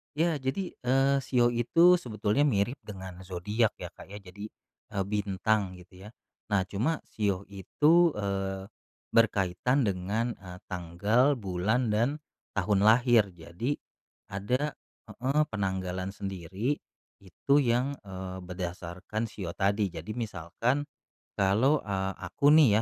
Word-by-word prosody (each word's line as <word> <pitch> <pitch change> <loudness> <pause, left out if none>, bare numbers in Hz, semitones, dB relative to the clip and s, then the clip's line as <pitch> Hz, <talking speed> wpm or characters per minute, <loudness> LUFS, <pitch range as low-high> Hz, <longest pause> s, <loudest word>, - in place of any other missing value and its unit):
Iya. 160 -1 +1
Jadi, 135 +9 -2
eee, 135 +2 +3
shio 120 -3 +2
itu 165 +10 +5
sebetulnya 110 +1 0
mirip 120 +2 0
dengan 95 -3 -8
zodiak 105 +5 0
ya 90 - -7
Kak - - -13
ya. 100 +2 -8
Jadi, 100 +2 -9 0.5
eee, 100 -1 0
bintang 100 -1 0
gitu 90 +2 -14
ya. - - -9 0.4
Nah, 100 -3 +2
cuma 115 - -1
shio 100 -3 -1
itu, 155 - +3
eee, 95 -1 -3 0.4
berkaitan 115 +4 +2
dengan, 105 +4 -1
eee, 90 -1 -10
tanggal, 100 - +2
bulan 110 +3 0
dan 115 +5 +2 0.5
tahun 100 0 +2
lahir, 115 -1 +5
jadi 85 - -3 0.5
ada 125 +9 -1 0.3
heeh, 135 +4 0
penanggalan 95 -2 -2
sendiri, 95 - -3 0.5
itu 95 +8 -1
yang, 125 +3 +1
eee, 95 -1 -6
berdasarkan 90 +3 -5
shio 90 -6 -6
tadi. 100 +1 +1
Jadi 85 +5 -6
misalkan 115 - -1 0.5
kalau, 110 +10 +3
eee, 95 -1 -2
aku 145 +1 +3
nih 155 -4 +7
105 Hz, 125 wpm, -29 LUFS, 95-125 Hz, 0.5 s, nih